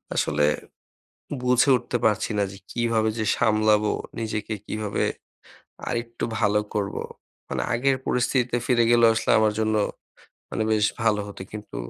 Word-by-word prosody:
আসলে 75 Hz, 0 st, +2 dB, 1.0 s
বুঝে 125 Hz, +2 st, +4 dB
উঠতে 125 Hz, -, -3 dB
পারছি 110 Hz, 0 st, +1 dB
না 100 Hz, -, +3 dB
যে 95 Hz, -, -10 dB
কিভাবে 115 Hz, -2 st, +1 dB
যে 110 Hz, -, 0 dB
সামলাবো? 105 Hz, -1 st, +3 dB, 0.3 s
নিজেকে 110 Hz, -1 st, -3 dB
কিভাবে 105 Hz, -1 st, -2 dB, 0.9 s
আরেকটু 120 Hz, -1 st, -3 dB, 0.2 s
ভালো 105 Hz, -1 st, +3 dB
করবো? 100 Hz, -2 st, -2 dB, 0.5 s
মানে -, -, -2 dB
আগের 135 Hz, +3 st, +2 dB
পরিস্থিতিতে 125 Hz, 0 st, +1 dB
ফিরে 120 Hz, -2 st, +3 dB
গেলেও 120 Hz, -1 st, +6 dB
আসলে 110 Hz, -, -1 dB
আমার 110 Hz, -1 st, +3 dB
জন্য 110 Hz, 0 st, +1 dB, 0.8 s
মানে -, -, -1 dB
বেশ 105 Hz, -1 st, +3 dB, 0.2 s
ভালো 110 Hz, -2 st, +2 dB
হতো। 100 Hz, -2 st, -8 dB
কিন্তু 105 Hz, 0 st, -8 dB
110 Hz, 135 wpm, -24 LUFS, 105-120 Hz, 1.0 s, গেলেও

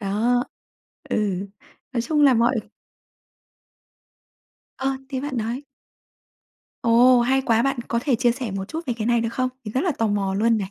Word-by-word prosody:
Đó. 230 Hz, +5 st, +1 dB, 0.7 s
Ừ. 200 Hz, -2 st, -1 dB, 0.5 s
Nói 240 Hz, -, 0 dB
chung 300 Hz, +4 st, +1 dB
là 265 Hz, -3 st, +6 dB
mọi 235 Hz, 0 st, +2 dB, 2.2 s
Ờ, 270 Hz, 0 st, -1 dB
thế 265 Hz, -2 st, -3 dB
bạn 280 Hz, -2 st, -4 dB
nói 235 Hz, +5 st, -2 dB, 1.2 s
Ồ, 240 Hz, +2 st, +6 dB
hay 265 Hz, +2 st, +2 dB
quá! 230 Hz, -2 st, +2 dB
Bạn 275 Hz, -1 st, 0 dB
có 235 Hz, -, 0 dB
thể 270 Hz, -4 st, +2 dB
chia 240 Hz, 0 st, +3 dB
sẻ 245 Hz, -3 st, -5 dB
một 195 Hz, 0 st, -3 dB
chút 325 Hz, 0 st, -5 dB
về 245 Hz, -, -1 dB
cái 220 Hz, -1 st, -3 dB
này 235 Hz, -1 st, +3 dB
được 230 Hz, -, -1 dB
không? 255 Hz, +1 st, 0 dB, 0.2 s
Mình 210 Hz, -, -6 dB
rất 260 Hz, -, +1 dB
là 355 Hz, -2 st, +1 dB
tò 225 Hz, -, +2 dB
mò 200 Hz, -2 st, 0 dB
luôn 225 Hz, +2 st, +2 dB
này. 195 Hz, -1 st, -4 dB
235 Hz, 180 wpm, -23 LUFS, 220-260 Hz, 2.2 s, là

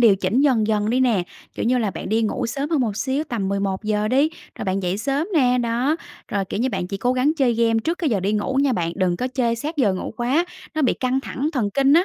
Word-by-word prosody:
điều 220 Hz, -5 st, +6 dB
chỉnh 195 Hz, +7 st, +1 dB
dần 250 Hz, -7 st, +3 dB
dần 210 Hz, 0 st, +1 dB
đi 255 Hz, -, +2 dB
nè, 230 Hz, -8 st, +3 dB, 0.3 s
kiểu -, -, -3 dB
như 250 Hz, +1 st, +3 dB
là 215 Hz, -4 st, 0 dB
bạn -, -, -6 dB
đi 225 Hz, +2 st, +2 dB
ngủ 220 Hz, -, -1 dB
sớm 280 Hz, +6 st, -3 dB
hơn 305 Hz, -5 st, +2 dB
một 215 Hz, -4 st, -1 dB
xíu, 265 Hz, +6 st, -1 dB
tầm 210 Hz, -8 st, -2 dB
11:00 200 Hz, +2 st, -1 dB
đi, 275 Hz, +5 st, +3 dB, 0.3 s
rồi -, -, -4 dB
bạn 190 Hz, 0 st, -1 dB
dậy 180 Hz, +3 st, -1 dB
sớm 280 Hz, +6 st, -1 dB
nè. 250 Hz, -4 st, +4 dB
Đó, 245 Hz, +6 st, +1 dB, 0.3 s
rồi, 200 Hz, -1 st, -1 dB
kiểu 200 Hz, -, -4 dB
như, 260 Hz, -, +2 dB
bạn 190 Hz, -5 st, -2 dB
chỉ 195 Hz, +2 st, -4 dB
cố 245 Hz, +5 st, +1 dB
gắng 260 Hz, +4 st, +2 dB
chơi 255 Hz, -6 st, +2 dB
game 230 Hz, -1 st, +2 dB
trước 335 Hz, +2 st, -1 dB
cái 315 Hz, -7 st, 0 dB
giờ 200 Hz, -4 st, +1 dB
đi 200 Hz, +3 st, 0 dB
ngủ 215 Hz, +5 st, -1 dB
nha 275 Hz, -3 st, +2 dB
bạn, 170 Hz, -4 st, -1 dB
đừng 180 Hz, -2 st, +1 dB
có 255 Hz, +5 st, -2 dB
chơi 240 Hz, -3 st, 0 dB
sát 300 Hz, +7 st, -4 dB
giờ 210 Hz, -9 st, +3 dB
ngủ 185 Hz, -, -5 dB
quá, 265 Hz, +8 st, +1 dB, 0.3 s
nó 310 Hz, -, 0 dB
bị 255 Hz, -, +3 dB
căng 260 Hz, +1 st, 0 dB
thẳng 280 Hz, +2 st, -3 dB
thần 220 Hz, -7 st, 0 dB
kinh 275 Hz, 0 st, +4 dB
á, 345 Hz, +3 st, +5 dB
235 Hz, 275 wpm, -22 LUFS, 205-270 Hz, 0.3 s, điều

